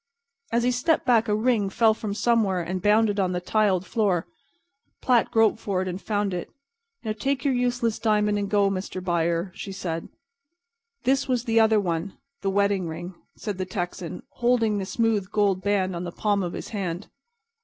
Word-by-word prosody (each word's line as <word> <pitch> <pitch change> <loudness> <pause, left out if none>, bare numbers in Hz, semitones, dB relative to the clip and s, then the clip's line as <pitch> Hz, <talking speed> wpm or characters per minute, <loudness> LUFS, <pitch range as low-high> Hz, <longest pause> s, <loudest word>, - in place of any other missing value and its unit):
As 235 +1 +2
he 250 - +3
stepped 250 +6 +1
back 235 -2 +4
a 210 - +2
ring 215 -3 +1
fell 220 +2 +4
from 210 -2 -4
somewhere 220 -5 +2
and 180 +2 -3
bounded 210 +1 +3
on 185 -2 +1
the 180 - -1
tiled 190 -1 +1
floor. 195 -6 +1 0.7
Platt 245 -3 +3
groped 225 0 +3
for 195 -4 -1
it - - -5
and 185 +1 -4
found 205 -2 -1
it. 175 - -4 0.5
"Now, 220 - -2
take 265 +5 -2
your 275 - +3
useless 245 -2 0
diamond 210 -2 +2
and 200 -1 -2
go, 200 -1 +3
Mr. 185 -1 -4
Buyer," 170 +1 0
she 195 - -7
said. 165 -4 -4 0.9
"This 270 +1 +2
was 250 -3 0
the 225 -2 +2
other 220 -1 +5
one—the 195 +7 -4
wedding 200 -2 +1
ring," 175 +3 -6 0.2
said 205 -4 -5
the 185 - -1
Texan, 175 -3 -5
holding 235 -4 +2
the 190 - -4
smooth 220 -4 0
gold 200 -3 +1
band 190 -2 0
on 170 - -4
the 175 - -5
palm 205 +2 0
of 175 -2 -3
his - - -6
hand. 190 -4 -4
205 Hz, 185 wpm, -25 LUFS, 185-225 Hz, 0.9 s, other